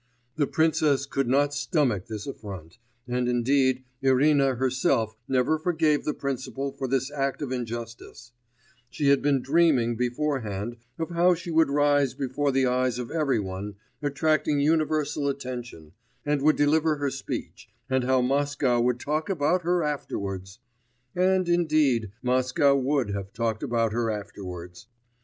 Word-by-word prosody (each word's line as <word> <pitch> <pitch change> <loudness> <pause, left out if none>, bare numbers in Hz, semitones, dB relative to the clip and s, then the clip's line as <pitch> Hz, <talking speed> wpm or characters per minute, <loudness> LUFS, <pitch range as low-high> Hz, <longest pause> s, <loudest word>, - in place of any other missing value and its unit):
The 145 -3 +1
princess 155 -3 +2
could 135 -1 -1
not 140 +3 +2
stomach 140 - 0
this 110 -3 -6
affront; 95 - -9 0.3
and 125 0 0
indeed 130 +1 +2 0.2
Irina 135 0 +3
herself 125 -3 0
never 135 +4 +1
forgave 160 -3 +1
the 150 - 0
principal 135 0 -3
for 135 - -5
this 130 +1 -1
act 140 0 -2
of 135 - -4
injustice; 120 0 -6 0.6
she 145 -2 0
had 140 -1 +4
been 140 -3 +1
dreaming 140 -7 +3
beforehand 120 -4 -2 0.2
of 165 +1 -4
how 175 +1 +4
she 170 0 -7
would 160 -2 +4
rise 145 -2 +2
before 140 +1 -1
the 135 0 +2
eyes 125 -1 +1
of 125 -2 -5
every 155 -6 +1
one, 100 +1 -5 0.3
attracting 150 0 +1
universal 155 -1 +1
attention, 125 - -5 0.3
and 145 -1 0
would 155 +2 +4
deliver 155 +2 +2
her 145 -2 -2
speech, - - -6 0.2
and 130 -1 +1
how 130 0 +2
Moscow 135 -1 +1
would 125 0 +1
talk 155 +5 -2
about 175 0 +1
her 175 0 +1
afterwards!... 100 -10 -4 0.6
And, 185 0 +2
indeed, 155 - +2
Moscow 130 +3 +3
would 135 -4 0
have 100 -1 -5
talked 115 0 -2
about 115 -5 0
her 115 -1 0
afterwards. 90 -3 -7
135 Hz, 145 wpm, -26 LUFS, 120-150 Hz, 0.6 s, had